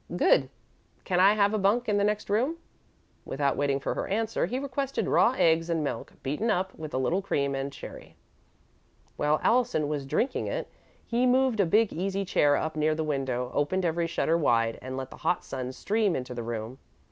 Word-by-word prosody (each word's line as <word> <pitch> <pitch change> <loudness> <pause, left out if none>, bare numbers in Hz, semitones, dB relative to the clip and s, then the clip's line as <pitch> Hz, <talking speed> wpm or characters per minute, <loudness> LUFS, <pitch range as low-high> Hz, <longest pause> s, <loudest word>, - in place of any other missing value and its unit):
"Good. 135 -6 +4 0.5
Can 180 -1 0
I 195 +3 +7
have 205 0 +2
a 215 - +1
bunk 210 +5 +2
in 210 -1 +2
the 200 - +2
next 210 0 0
room?" 250 +11 0 0.7
Without 140 0 -1
waiting 140 -1 0
for - - -2
her - - -3
answer, 220 +3 0
he 250 - -2
requested 275 0 -2
raw 250 - +4
eggs 165 +1 +3
and 165 -2 0
milk, 145 - -4
beaten 150 - -1
up 190 -2 0
with 155 -3 -7
a - - +1
little 145 +9 +1
cream 140 -7 -1
and 135 +1 -3
sherry. - - -10 1.0
While 150 +1 +1
Allison 240 -11 +2
was 145 -2 -3
drinking 250 - 0
it, - - -3 0.4
he 240 +2 +1
moved 255 -2 +3
a 195 - +4
big 215 +5 +3
easy 195 +3 -2
chair 145 -5 +3
up 155 0 -3
near 155 0 +1
the 160 - -1
window, 130 -4 -2
opened 180 +6 0
every 170 0 0
shutter 165 0 +1
wide, 115 -6 +2
and 130 0 -6
let 130 0 -5
the - - -10
hot 175 - -1
sun 130 -1 -4
stream 205 +6 0
into 125 -1 -4
the 120 - -4
room. 115 +2 -5
165 Hz, 200 wpm, -28 LUFS, 140-210 Hz, 1.0 s, I